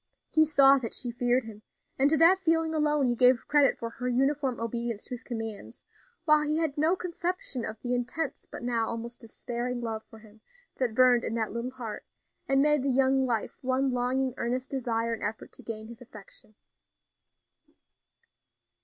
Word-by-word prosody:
He 315 0 +5
saw 275 -2 +6
that 230 -3 -4
she 245 - -2
feared 245 +1 +1
him, 215 -2 -11 0.4
and 275 +2 +4
to 315 - +3
that 345 +5 +6
feeling 325 -3 +1
alone 300 -2 +2
he 245 - +2
gave 250 0 +4
credit 290 -2 +4
for 230 0 -5
her 250 +2 -5
uniform 270 +1 0
obedience 230 -1 -3
to - - -8
his 250 -1 -5
commands, 225 -4 -7 0.4
while 305 -1 +5
he 300 +1 0
had 320 -4 -1
no 315 +5 +2
conception 355 -7 -3
of 220 -1 -6
the 245 0 -1
intense, 250 +6 -3
but - - -8
now 235 -2 0
almost 235 +1 -6
despairing 240 +2 -5
love 225 -2 -4
for 225 - -13
him 215 0 -18 0.4
that 245 -4 0
burned 250 -1 +5
in 225 - -2
that 220 -2 -1
little 235 +2 -3
heart, 240 -5 -7 0.5
and 270 0 +4
made 300 -1 +3
the 275 - -1
young 265 0 +2
life 230 -3 -2
one 260 +1 0
longing, 255 +1 0
earnest 250 +2 -2
desire 230 -3 -1
and 225 - -6
effort 215 +1 -4
to - - -13
gain 220 -1 -7
his 235 0 -12
affection. 215 -2 -14
250 Hz, 180 wpm, -28 LUFS, 230-275 Hz, 0.5 s, saw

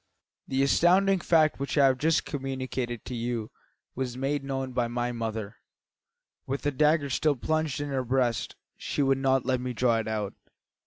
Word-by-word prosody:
"The 135 +1 +1
astounding 185 +6 +4
fact 155 -3 +3
which 140 +2 -3
I 140 - +6
have 130 -1 +3
just 160 +3 +2
communicated 130 -4 -4
to 125 - -6
you 115 -2 -3 0.4
was 125 -1 -4
made 140 +2 -1
known 135 -1 -3
by 120 -1 +1
my 120 +1 -2
mother, 110 -2 -4 0.9
with 135 +1 -3
the 145 - +1
dagger 150 +1 +2
still 150 +3 +2
plunged 155 +2 -1
in 145 0 -3
her 135 -2 -1
breast. 125 -2 0 0.2
She 145 - -1
would 135 0 +2
not 135 -1 +2
let 130 -1 0
me 125 0 -3
draw 120 -1 +2
it 110 -1 -2
out. 105 -2 -2
130 Hz, 175 wpm, -28 LUFS, 120-145 Hz, 0.9 s, I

